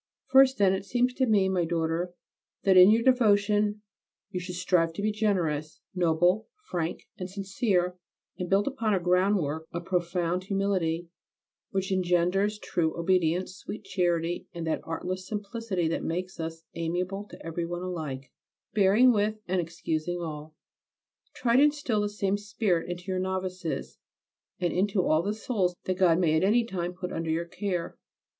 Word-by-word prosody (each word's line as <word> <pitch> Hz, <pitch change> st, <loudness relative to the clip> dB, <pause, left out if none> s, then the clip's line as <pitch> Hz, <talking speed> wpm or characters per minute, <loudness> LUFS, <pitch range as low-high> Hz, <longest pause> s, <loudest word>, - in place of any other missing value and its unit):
First, 265 Hz, 0 st, +5 dB
then, 195 Hz, -2 st, +4 dB
it 190 Hz, 0 st, -2 dB
seems 245 Hz, +4 st, +1 dB
to 260 Hz, 0 st, +1 dB
me, 205 Hz, -4 st, +4 dB
my 185 Hz, -2 st, +1 dB
daughter, 165 Hz, +1 st, -1 dB, 0.5 s
that 195 Hz, -2 st, +4 dB
in 185 Hz, +1 st, +9 dB
your 225 Hz, +2 st, +4 dB
devotion 210 Hz, -4 st, +3 dB, 0.5 s
you 180 Hz, -, -2 dB
should 180 Hz, 0 st, -6 dB
strive 175 Hz, -2 st, +2 dB
to 185 Hz, -, -5 dB
be 215 Hz, -, +2 dB
generous, 175 Hz, -8 st, -1 dB
noble, 180 Hz, +4 st, +2 dB, 0.2 s
frank 170 Hz, -1 st, -3 dB
and 185 Hz, 0 st, -4 dB
sincere, 190 Hz, -2 st, -1 dB, 0.4 s
and 180 Hz, -1 st, -5 dB
build 195 Hz, +1 st, +3 dB
upon 230 Hz, -7 st, 0 dB
a -, -, +1 dB
groundwork 180 Hz, -4 st, +1 dB
of 170 Hz, 0 st, -5 dB
profound 175 Hz, 0 st, -1 dB
humility 185 Hz, -4 st, 0 dB, 0.6 s
which 190 Hz, 0 st, -2 dB
engenders 185 Hz, +3 st, +2 dB
true 165 Hz, -6 st, -1 dB
obedience, 180 Hz, +1 st, +1 dB
sweet 215 Hz, -, -8 dB
charity, 175 Hz, -3 st, -1 dB
and 170 Hz, -1 st, -4 dB
that 160 Hz, -, -1 dB
artless 185 Hz, +3 st, -4 dB
simplicity 205 Hz, -4 st, -2 dB
that 165 Hz, -, -1 dB
makes 180 Hz, +3 st, -3 dB
us 165 Hz, 0 st, -5 dB
amiable 180 Hz, +4 st, -2 dB
to -, -, -13 dB
every 165 Hz, +1 st, -3 dB
one 175 Hz, +1 st, -4 dB
alike, 150 Hz, -8 st, -5 dB, 0.4 s
bearing 215 Hz, +5 st, +5 dB
with 210 Hz, 0 st, +1 dB
and 185 Hz, 0 st, +1 dB
excusing 165 Hz, +1 st, -3 dB
all. 155 Hz, -2 st, -6 dB, 0.8 s
Try 235 Hz, 0 st, +2 dB
to 275 Hz, -, +7 dB
instil 290 Hz, -8 st, +1 dB
this 205 Hz, 0 st, -3 dB
same 200 Hz, 0 st, +1 dB
spirit 205 Hz, -5 st, -1 dB
into 175 Hz, 0 st, -5 dB
your 185 Hz, -1 st, -1 dB
novices 185 Hz, -2 st, -3 dB, 0.6 s
and 175 Hz, -, 0 dB
into 195 Hz, 0 st, +1 dB
all 155 Hz, -1 st, +3 dB
the 205 Hz, +4 st, -2 dB
souls 200 Hz, -6 st, -1 dB
that 185 Hz, 0 st, -2 dB
God 170 Hz, -3 st, +5 dB
may 165 Hz, -3 st, +2 dB
at 160 Hz, -, +2 dB
any 225 Hz, +5 st, +4 dB
time 180 Hz, -6 st, -3 dB
put 180 Hz, 0 st, -5 dB
under 165 Hz, 0 st, -3 dB
your 165 Hz, +2 st, 0 dB
care. 180 Hz, -1 st, -4 dB
185 Hz, 165 wpm, -28 LUFS, 170-205 Hz, 0.8 s, in